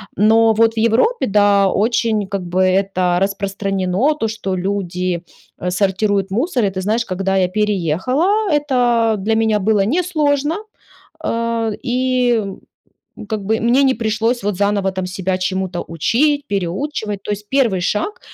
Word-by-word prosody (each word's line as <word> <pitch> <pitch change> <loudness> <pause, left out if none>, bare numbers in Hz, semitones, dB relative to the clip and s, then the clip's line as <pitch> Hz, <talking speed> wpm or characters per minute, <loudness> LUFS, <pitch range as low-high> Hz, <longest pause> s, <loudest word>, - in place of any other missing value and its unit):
Но 225 +1 +4
вот 225 +1 +2
в - - -21
Европе, 235 - +2
да, 200 -1 +3
очень 220 -2 0
как 195 -1 -4
бы 180 +2 -1
это 185 -1 +1
распространено- 195 +4 0
то, 225 - 0
что 195 -3 -3
люди, 180 -2 -2 0.4
а, 180 0 -2
сортируют 195 +1 0
мусор. 245 - 0
И - - +1
ты 190 0 -5
знаешь, 220 +4 0
когда 195 +1 -2
я 185 -1 +3
переехала, 210 - 0 0.2
это 295 -2 0 0.4
для 220 +3 0
меня 220 -1 +2
было 205 -1 +2
несложно. 300 - 0 0.6
А, 230 -1 -1
и, 250 -1 +1
м, 195 -3 -5 0.7
как 215 -1 -2
бы 220 +2 0
мне 240 +4 +3
не 265 - +3
пришлось, 225 +1 -1
вот, 205 -2 -1
заново 200 -1 +1
там 185 -1 -3
себя 185 0 -2
чему 190 0 -1
то 175 -1 -5
учить, 285 - +1
переучивать. 205 - -3
То - - -6
есть 205 0 -6
первый 235 -9 +2
шаг, 210 - -2
210 Hz, 155 wpm, -18 LUFS, 190-230 Hz, 0.7 s, Но